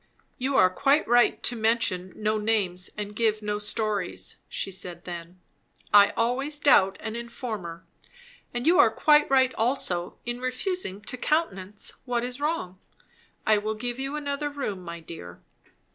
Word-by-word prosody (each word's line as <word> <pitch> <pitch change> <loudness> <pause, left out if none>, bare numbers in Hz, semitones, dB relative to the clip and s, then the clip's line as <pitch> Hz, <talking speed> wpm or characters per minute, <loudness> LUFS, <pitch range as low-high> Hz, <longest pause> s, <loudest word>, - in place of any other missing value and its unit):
"You 265 +2 0
are 185 0 +6
quite 280 +9 +2
right 240 +1 +4
to 245 - +1
mention 220 -5 +1
no 215 0 0
names 200 -4 0
and 210 0 -5
give 215 -1 +1
no 210 0 -1
stories," 210 -3 -2
she 195 - -3
said 180 -2 -7
then. 175 0 -8 0.5
"I 205 -1 +8
always 265 +6 0
doubt 220 -10 +5
an 220 0 -4
informer. 220 -8 -6 0.7
And 240 +1 -3
you 350 +3 +5
are - - +8
quite 300 -1 +4
right 260 -1 +4
also 220 -8 -1
in 240 +1 -4
refusing 255 - -2
to 255 - -6
countenance 210 - -1
what 240 -2 0
is 250 +3 -5
wrong. 290 - -2 0.7
I 215 -1 +4
will 215 +1 -2
give 240 +3 -4
you 270 +2 -3
another 290 0 -2
room, 270 -10 -4
my 170 -1 -7
dear." 90 - -9
220 Hz, 155 wpm, -26 LUFS, 190-260 Hz, 0.7 s, I